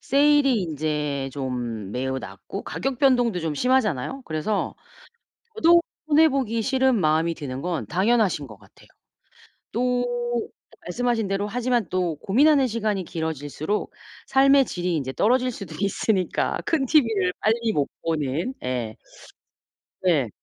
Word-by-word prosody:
세일이 280 Hz, -4 st, +3 dB
인제 150 Hz, -3 st, -2 dB
좀 120 Hz, -7 st, -4 dB
매우 130 Hz, +2 st, -2 dB
낮고 95 Hz, -, -8 dB
가격 265 Hz, -1 st, -3 dB
변동도 245 Hz, -9 st, +3 dB
좀 160 Hz, -2 st, -2 dB
심하잖아요. 250 Hz, -, 0 dB
그래서 165 Hz, +6 st, -2 dB, 0.8 s
저도 340 Hz, -4 st, +5 dB, 0.3 s
손해 315 Hz, +1 st, +5 dB
보기 255 Hz, -5 st, -1 dB
싫은 265 Hz, +1 st, +2 dB
마음이 160 Hz, +1 st, +2 dB
드는 135 Hz, -4 st, -6 dB
건 175 Hz, -2 st, -2 dB
당연하신 195 Hz, -5 st, +1 dB
것 110 Hz, -5 st, -13 dB
같아요. -, -, -21 dB, 0.8 s
또 245 Hz, +1 st, +1 dB, 0.8 s
말씀하신 230 Hz, +3 st, 0 dB
대로 195 Hz, +1 st, -1 dB
하지만 240 Hz, -3 st, 0 dB
또 180 Hz, -3 st, -1 dB
고민하는 270 Hz, -, +4 dB
시간이 215 Hz, -5 st, -1 dB
길어질수록 160 Hz, +3 st, -3 dB, 0.3 s
삶의 275 Hz, 0 st, +5 dB
질이 180 Hz, -3 st, -2 dB
인제 135 Hz, -3 st, -3 dB
떨어질 250 Hz, -, +2 dB
수도 195 Hz, -9 st, -8 dB
있으니까 195 Hz, -1 st, 0 dB
큰 315 Hz, -5 st, +1 dB
TV를 225 Hz, -10 st, +3 dB
빨리 225 Hz, +1 st, +1 dB
못 145 Hz, -6 st, 0 dB
보는 160 Hz, -, -1 dB
예. 125 Hz, -4 st, -3 dB, 1.1 s
네. 155 Hz, -10 st, +2 dB
195 Hz, 280 characters per minute, -24 LUFS, 150-250 Hz, 1.1 s, 저도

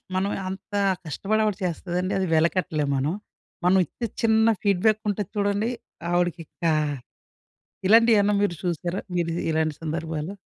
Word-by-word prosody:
మనం 195 Hz, +2 st, +1 dB, 0.2 s
అంత 195 Hz, +2 st, -8 dB, 0.3 s
కష్టపడి 205 Hz, +8 st, 0 dB
ఆవిడ 210 Hz, -3 st, 0 dB
చేస్తదండి. 180 Hz, +2 st, -2 dB
అది 190 Hz, -, 0 dB
వెలకట్టలేము 160 Hz, -3 st, +1 dB
మనం. 140 Hz, +5 st, 0 dB, 0.5 s
మనం 185 Hz, +2 st, +5 dB
ఇచ్చే 235 Hz, -, -5 dB, 0.2 s
చిన్న 220 Hz, 0 st, +4 dB, 0.2 s
ఫీడ్‌బ్యాక్ 205 Hz, +2 st, +3 dB
ఉంటది 205 Hz, -1 st, -3 dB
చూడండి, 205 Hz, +3 st, +1 dB, 0.4 s
ఆవిడకి 175 Hz, -1 st, +1 dB
ఇంకా 165 Hz, +2 st, -1 dB, 1.1 s
ఇలాంటివి 225 Hz, +2 st, +6 dB
ఏమన్నా 205 Hz, +1 st, +2 dB
మీరు 200 Hz, -4 st, +1 dB
చూసారా? 175 Hz, +1 st, -2 dB, 0.2 s
మీరు 170 Hz, -1 st, 0 dB, 0.2 s
ఇలాంటి 155 Hz, -1 st, +1 dB
సందర్భాలు? 160 Hz, +2 st, -3 dB
185 Hz, 130 wpm, -25 LUFS, 165-205 Hz, 1.1 s, ఇలాంటివి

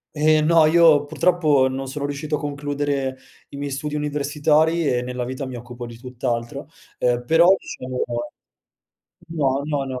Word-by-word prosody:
Eh, 155 Hz, +1 st, +3 dB
no 160 Hz, 0 st, +5 dB
io 155 Hz, -3 st, +5 dB
purtroppo 155 Hz, -3 st, +2 dB
non 135 Hz, +1 st, -4 dB
sono 140 Hz, +1 st, -4 dB
riuscito 145 Hz, +1 st, -3 dB
a -, -, -8 dB
concludere 145 Hz, -2 st, -2 dB, 0.3 s
i 140 Hz, -, -10 dB
miei 140 Hz, 0 st, -4 dB
studi 150 Hz, +2 st, -4 dB
universitari 150 Hz, +2 st, +1 dB
e 125 Hz, -1 st, +1 dB
nella 125 Hz, 0 st, -4 dB
vita 130 Hz, +2 st, -5 dB
mi 130 Hz, -1 st, -7 dB
occupo 120 Hz, +1 st, -8 dB
di 120 Hz, -1 st, -10 dB
tutt'altro, 125 Hz, +2 st, -4 dB, 0.3 s
ehm, 120 Hz, 0 st, 0 dB
però 165 Hz, +5 st, +5 dB
diciamo 130 Hz, -6 st, -5 dB, 1.3 s
no, 140 Hz, -5 st, 0 dB
no, 145 Hz, -2 st, -1 dB
no 130 Hz, -1 st, -5 dB
145 Hz, 155 wpm, -22 LUFS, 130-150 Hz, 1.3 s, no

